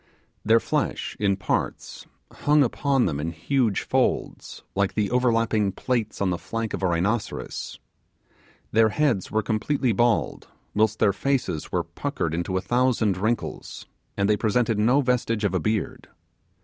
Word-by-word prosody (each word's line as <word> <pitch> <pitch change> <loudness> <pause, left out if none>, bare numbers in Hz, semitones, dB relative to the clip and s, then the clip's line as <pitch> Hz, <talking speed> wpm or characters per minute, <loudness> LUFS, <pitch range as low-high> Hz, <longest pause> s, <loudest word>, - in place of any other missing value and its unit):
Their 115 +2 +5
flesh, - - -2
in 100 -2 +2
parts, 95 - -3 0.2
hung 150 0 +3
upon 135 +1 +1
them 75 -5 -1
in 80 +3 -2
huge 110 - 0
folds, - - -1
like 95 -1 0
the 105 -1 0
overlapping 115 -4 +2
plaits 120 +1 -2
on 95 -2 +1
the 90 - -2
flank 115 -1 -4
of - - -3
a 95 - +2
rhinoceros. 95 +7 -2 0.9
Their 110 0 +4
heads 125 -7 0
were 110 0 0
completely 115 +5 0
bald, 115 +1 +1 0.3
whilst 110 0 +2
their 100 - +3
faces 100 - -1
were - - 0
puckered 80 - -3
into 85 +3 -1
a - - -1
thousand 120 -5 +1
wrinkles, 110 +6 -3 0.3
and 100 0 +2
they 105 0 +3
presented 110 0 +1
no 125 +7 +4
vestige 120 -4 0
of 100 -2 +1
a 95 - +1
beard. 110 +4 -2
110 Hz, 150 wpm, -25 LUFS, 100-120 Hz, 0.9 s, Their